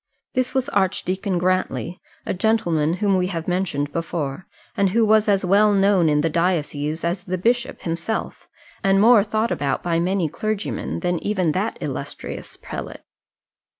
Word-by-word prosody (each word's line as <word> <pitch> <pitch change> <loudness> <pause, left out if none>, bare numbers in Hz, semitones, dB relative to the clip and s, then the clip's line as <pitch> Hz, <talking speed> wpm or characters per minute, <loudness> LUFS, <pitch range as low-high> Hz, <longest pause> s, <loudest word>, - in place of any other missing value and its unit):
This 255 +1 -1
was 260 0 +1
Archdeacon 190 -2 0
Grantly, 180 -1 -1 0.2
a - - -1
gentleman 175 -6 +1
whom 200 -1 +2
we 180 0 +1
have 165 -3 -4
mentioned 175 -6 -1
before, 165 -1 -3 0.3
and 200 -1 +2
who 225 +4 +3
was 215 0 +4
as 195 -2 +2
well 205 +3 +4
known 195 -4 +4
in 150 0 +3
the 165 - +1
diocese 160 -2 -1
as 175 +2 -1
the 185 -1 -3
bishop 240 +6 0
himself, 170 +6 -4 0.3
and 195 0 +4
more 220 0 +6
thought 220 +2 -1
about 140 -2 -1
by 170 -1 +1
many 180 0 +1
clergymen 215 +6 -3
than 175 -2 0
even 185 -6 +1
that 195 +7 -2
illustrious - - -6
prelate. - - -7
185 Hz, 155 wpm, -22 LUFS, 170-210 Hz, 0.3 s, more